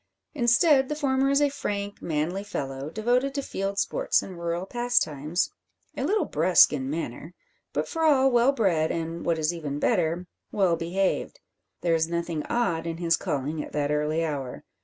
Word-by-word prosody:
Instead, 265 +2 +4
the 300 - -1
former 270 -2 +1
is 280 +1 +3
a 290 - +3
frank, 205 -7 -4
manly 165 +5 -2
fellow, 135 -8 -5
devoted 245 - 0
to 280 - -1
field 195 -3 -3
sports - - +1
and 185 -3 -9
rural 170 +1 -2
pastimes, 175 - 0 0.4
a - - -3
little 420 +1 +1
brusque 165 +1 +5
in 135 -2 -3
manner, 155 +2 -5 0.4
but - - -2
for 325 - -4
all 270 -4 +4
well 245 +2 +4
bred, 180 - +1
and, 165 0 -4
what 165 -1 +2
is 155 +2 0
even 150 -4 -4
better, 175 -1 +1 0.3
well 190 -4 +2
behaved. 180 +4 -1 0.4
There 170 -1 +1
is 160 0 +2
nothing 170 -2 -2
odd 170 -9 0
in 165 -1 -3
his 165 -1 +2
calling 150 +2 -3
at - - -11
that 145 -1 0
early 150 +2 0
hour. 140 -5 -4
175 Hz, 175 wpm, -26 LUFS, 160-240 Hz, 0.4 s, brusque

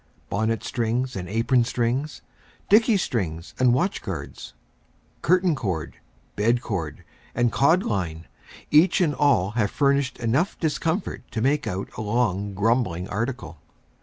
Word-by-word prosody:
Bonnet 110 +3 0
strings 120 +2 -1
and 90 -2 -5
apron 115 +3 +2
strings, 125 +4 -2 0.5
dickey 220 +1 +5
strings 90 - -3
and 125 -1 +5
watch 175 +11 0
guards, 80 -9 -7 0.7
curtain 180 +1 +3
cord, 95 - -3 0.4
bed 115 +4 +2
cord, 85 -10 -4 0.3
and 120 -1 +2
cod 160 +10 +3
line, 85 -6 -3 0.5
each 160 +4 +5
and 165 -5 +2
all 135 -11 +2
have 110 -3 0
furnished 140 0 +1
enough 130 - 0
discomfort 165 +3 -1
to 110 - -4
make 140 +6 +1
out 95 +2 -4
a - - -3
long 105 -3 0
grumbling 105 -4 0
article. 110 - -4
120 Hz, 135 wpm, -24 LUFS, 100-140 Hz, 0.7 s, dickey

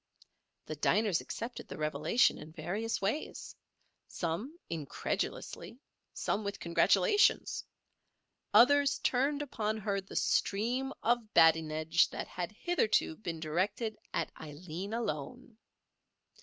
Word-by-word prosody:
The 155 - -5
diners 195 +4 +2
accepted 235 +2 -6
the - - -8
revelation 155 - +2
in 155 - -10
various 200 +8 -2
ways—some 215 - -5
incredulously, 165 - -4 0.3
some 215 - -2
with 200 0 -4
congratulations; 410 - +3 0.9
others 275 +5 +6
turned 280 +3 +1
upon 220 -6 -2
her 200 -2 -1
the 195 - -12
stream 245 +7 +1
of 235 -2 0
badinage 160 0 +4
that - - -5
had 180 0 -4
hitherto 215 - +1
been 170 -6 -5
directed 195 +8 -1 0.2
at - - -2
Aileen 160 +5 -7
alone. 230 - -5
205 Hz, 100 wpm, -32 LUFS, 165-240 Hz, 0.9 s, others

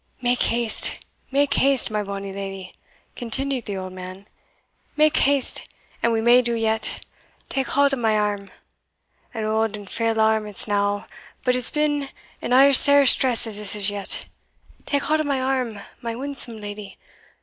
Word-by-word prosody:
"Mak 245 -1 0
haste, 235 -1 +3 0.3
mak 280 +1 +1
haste, 270 -4 +3
my 210 0 -1
bonny 200 -1 -6
leddy," 195 -1 -7 0.4
continued 260 +1 -2
the 200 -2 -5
old 185 0 -7
man 185 +2 -10 0.7
"mak 305 +1 +3
haste, 280 -1 +3 0.4
and 235 - +1
we 225 -1 0
may 240 +2 +5
do 235 -1 -1
yet! 225 -1 -1 0.4
Take 270 -1 -2
haud 280 0 +2
o' - - 0
my 220 -3 +1
arm 205 -2 -2 0.8
an 220 -2 -5
auld 220 0 -1
and 205 -1 -11
frail 225 +2 -2
arm 220 -1 +2
it's 210 +1 0
now, 205 0 -1 0.4
but 250 -1 +1
it's 250 - +1
been 295 -2 -1 0.3
in - - -5
as 270 +1 +7
sair 285 -1 +4
stress 250 -2 +4
as 220 -2 -7
this 210 -1 -4
is 205 -1 0
yet. 200 -1 0 0.6
Take 285 -1 -1
haud 310 0 0
o' - - -1
my 280 -3 -1
arm, 255 -5 -2 0.2
my 230 -1 -5
winsome 255 -3 -4
leddy! 205 -1 -9
230 Hz, 170 wpm, -22 LUFS, 205-270 Hz, 0.8 s, as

